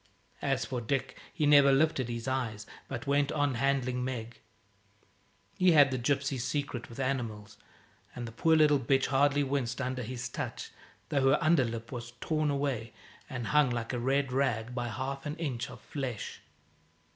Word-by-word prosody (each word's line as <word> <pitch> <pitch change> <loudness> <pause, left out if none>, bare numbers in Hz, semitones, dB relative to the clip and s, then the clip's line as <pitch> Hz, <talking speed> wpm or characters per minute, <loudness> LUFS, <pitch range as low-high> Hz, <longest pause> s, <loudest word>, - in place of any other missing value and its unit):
As 135 -2 0
for 125 -2 -3
Dick, 130 +2 -2
he 150 - 0
never 145 -1 +7
lifted 135 -3 +2
his 115 0 -4
eyes, 115 -5 -2 0.2
but 120 -3 -5
went 140 0 +2
on 145 -2 +1
handling 130 0 0
Meg. 120 -3 -5 1.2
He 185 -2 +6
had 145 -3 +6
the 130 - -1
gypsy's 135 0 0
secret 140 -4 -3
with 115 - -10
animals, 120 -6 -3 0.6
and 120 -1 -5
the - - -7
poor 160 +8 +3
little 150 -2 +5
bitch 135 +1 +2
hardly 145 +1 +3
winced 130 -3 -1
under 130 -1 -2
his 125 +1 -4
touch, 120 - -5 0.4
though 135 -2 +3
her 140 - +5
under 155 -3 +4
lip 115 -1 -5
was 120 -2 -6
torn 155 -2 0
away, 135 -6 -2 0.4
and 125 -2 -4
hung, 150 -3 +5
like 120 0 -3
a 125 - -1
red 135 +2 +1
rag, 125 -3 0
by 120 -1 -2
half 135 +4 -4
an 150 - -3
inch 140 -6 -3
of 125 -2 -10
flesh. 130 -6 -5
130 Hz, 170 wpm, -30 LUFS, 120-140 Hz, 1.2 s, never